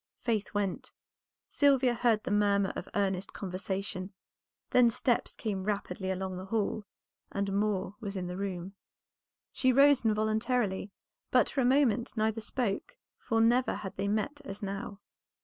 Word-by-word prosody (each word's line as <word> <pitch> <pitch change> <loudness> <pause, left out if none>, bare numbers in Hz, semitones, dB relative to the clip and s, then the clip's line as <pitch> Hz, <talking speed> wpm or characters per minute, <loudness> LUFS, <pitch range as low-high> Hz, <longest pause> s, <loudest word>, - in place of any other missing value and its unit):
Faith 220 -4 -1
went; 200 -3 -2 0.6
Sylvia 270 -3 +3
heard 230 -2 +2
the - - -3
murmur 200 -1 +2
of - - -6
earnest 195 -1 0
conversation; 190 0 -4 0.6
then 250 -1 +6
steps 240 +1 0
came 200 -4 -3
rapidly 200 -2 -2
along 190 0 -3
the 185 - -6
hall, 210 0 -1 0.4
and 200 0 -1
Moor 200 -2 0
was 205 -3 -5
in 185 -1 -3
the 180 0 -4
room. 190 -1 -4 0.8
She 255 - +2
rose 275 +1 +6
involuntarily, 215 -1 +1 0.4
but - - +3
for 270 - 0
a - - +2
moment 245 -3 +2
neither 220 +1 +1
spoke, 220 -2 -2 0.2
for 225 - -1
never 240 +3 +3
had 190 - -6
they 195 +1 -2
met 220 +8 -1
as 205 -5 -8
now. 200 0 -5
205 Hz, 150 wpm, -30 LUFS, 195-235 Hz, 0.8 s, then